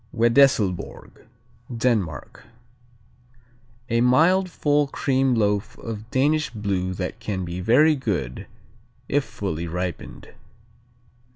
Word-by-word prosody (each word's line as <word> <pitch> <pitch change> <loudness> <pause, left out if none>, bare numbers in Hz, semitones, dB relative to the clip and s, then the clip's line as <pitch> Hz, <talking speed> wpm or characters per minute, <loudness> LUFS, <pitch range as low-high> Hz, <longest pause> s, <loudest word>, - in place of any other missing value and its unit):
Wedesslborg 115 -6 +1 0.5
Denmark 105 - -2 1.5
A 115 0 +2
mild, 170 +10 +4
full 145 -3 +1
cream 135 -1 +1
loaf 105 -2 0
of 110 -1 -7
Danish 150 +5 +1
blue 95 -4 -2
that 90 0 -5
can 95 -3 -4
be 85 +1 -5
very 145 - +4
good 95 - -3 0.6
if - - +1
fully 80 +2 -5
ripened. 90 -1 -6
115 Hz, 95 wpm, -23 LUFS, 90-135 Hz, 1.5 s, mild